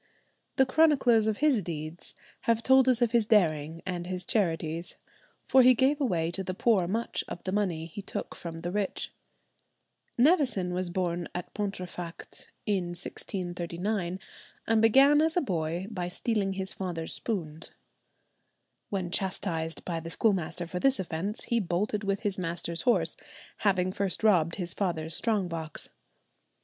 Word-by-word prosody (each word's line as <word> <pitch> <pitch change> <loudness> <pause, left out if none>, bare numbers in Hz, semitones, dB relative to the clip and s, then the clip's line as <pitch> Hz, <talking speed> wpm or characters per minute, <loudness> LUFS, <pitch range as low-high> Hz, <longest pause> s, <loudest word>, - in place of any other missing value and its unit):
The 265 - +5
chroniclers 260 -6 +4
of 215 -1 0
his 270 -8 +4
deeds 160 -1 -6 0.3
have 230 0 +3
told 265 0 +5
us 245 -1 +4
of 235 - +1
his 235 -3 +3
daring 165 -6 +2
and 175 -2 -3
his 180 -1 -4
charities, 165 -4 -1 0.5
for 260 - +6
he 255 0 +7
gave 275 +5 +2
away 170 -10 +1
to 190 +2 -3
the 185 0 -4
poor 200 -4 +3
much 225 +5 -2
of 175 - -7
the 185 - -2
money 185 -6 0
he 170 +5 -8
took - - -5
from 165 -1 -7
the 175 +1 -3
rich." 200 0 -2 1.1
Nevison 245 - +3
was 180 0 -1
born 175 -1 -2
at 180 - -5
Pontefract 180 -4 -6 0.2
in 180 -4 -1
1639, 180 +1 -3 0.5
and 225 -1 +3
began 275 +6 +6
as 320 +2 +1
a - - +6
boy 170 - -2
by 180 -4 -3
stealing 195 +1 -1
his 190 0 -2
father's 170 -4 -4
spoons. 165 -8 -3 1.2
When 185 -3 -2
chastised 175 -4 -1
by 170 -2 -2
the 165 +1 -7
schoolmaster 175 -3 0
for 180 +1 -4
this 270 +6 +3
offence, 190 +4 -3
he 235 - +1
bolted 200 +2 -1
with 200 0 -1
his 200 -3 -1
master's 170 -1 -3
horse, 245 - +2 0.4
having 185 -3 +1
first 195 +1 -1
robbed 170 -6 +4
his 180 -2 -4
father's 165 -5 -2
strong 210 -5 +1
box. 165 -2 -5
185 Hz, 155 wpm, -29 LUFS, 170-220 Hz, 1.2 s, he